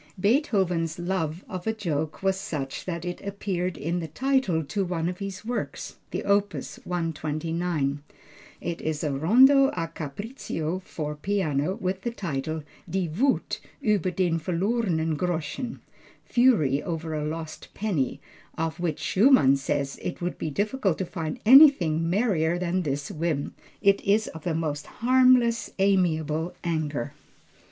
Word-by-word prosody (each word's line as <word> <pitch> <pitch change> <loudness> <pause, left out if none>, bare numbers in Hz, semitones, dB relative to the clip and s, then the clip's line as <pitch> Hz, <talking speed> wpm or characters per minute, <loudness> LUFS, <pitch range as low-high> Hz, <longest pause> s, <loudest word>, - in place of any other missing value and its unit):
Beethoven's 190 - +1
love 175 -2 -2
of 185 +1 -6
a 220 - +2
joke 160 -7 -3
was 190 0 +3
such 155 -9 -4
that 170 -2 -4
it 175 0 -4
appears 185 -3 -3
in 170 +3 -2
the 165 - -4
title 245 - +1
to 195 +7 -2
one 170 -2 -2
of 180 0 -4
his 195 0 -6
works, 245 +1 -4
the - - -3
opus 200 0 0
129. 160 -3 -2 0.6
It 170 -1 -4
is 155 -1 -2
a 150 - 0
rondo 255 - +6
a 165 -2 -2
capriccio 165 - -4
for 150 -4 -5
piano, 160 -2 0
with 190 -3 -3
the 235 - -2
title, 155 - -3 0.3
Die 180 -2 -1
Wuth 265 +6 +1 0.2
über 205 -4 +2
den 175 -3 +1
verlorenen 175 -2 0
Groschen 175 - -3 0.4
(fury 205 - +3
over 165 -2 -4
a 150 -1 -2
lost 155 +1 -5
penny), 180 - -1 0.4
of 160 +1 -2
which 165 -3 -1
Schumann 195 - +5
says 140 0 -2
"it 175 - -4
would 175 0 -3
be 155 - -2
difficult 205 - 0
to 190 - -2
find 160 -4 -4
anything 205 - +7
merrier 175 -5 +1
than 180 +1 0
this 145 -3 -3
whim. 155 -3 -2 0.3
It 200 -1 +4
is 210 +2 +2
the 165 0 -1
most 150 -3 -2
harmless 250 -1 +3
amiable 170 -4 +1
anger." 155 -6 -2
175 Hz, 140 wpm, -26 LUFS, 155-200 Hz, 0.6 s, anything